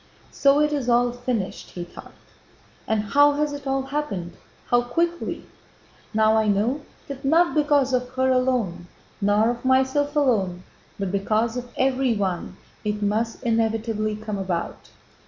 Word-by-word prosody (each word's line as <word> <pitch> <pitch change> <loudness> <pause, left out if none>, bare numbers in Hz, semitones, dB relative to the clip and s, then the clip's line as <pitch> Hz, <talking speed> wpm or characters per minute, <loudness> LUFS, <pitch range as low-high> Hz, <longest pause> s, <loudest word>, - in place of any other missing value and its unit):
"So 280 +1 +4
it 300 0 +2
is 270 -4 -1
all 240 0 +3
finished!" 245 -5 -3
he 175 - -6
thought. 175 - -12 0.7
"And 220 -1 +1
how 285 +7 +4
has 295 0 -1
it 285 -1 -7
all 270 0 0
happened? 265 - -4 0.3
How 240 0 +3
quickly! 335 +8 -2 0.7
Now 220 0 +3
I 220 -1 +2
know 215 +8 +1 0.3
that 275 0 -7
not 330 +5 +3
because 290 -3 +2
of 250 0 0
her 260 0 +2
alone, 250 -9 0 0.3
nor 205 +3 +3
of 240 0 -7
myself 265 +3 +2
alone, 200 -11 +1 0.3
but 195 -2 -2
because 215 +4 0
of 245 -1 -5
everyone, 245 -9 0 0.3
it 210 0 -2
must 225 +4 -1
inevitably 225 -2 0
come 215 -1 -5
about. 180 -3 -4
240 Hz, 145 wpm, -24 LUFS, 210-270 Hz, 0.7 s, So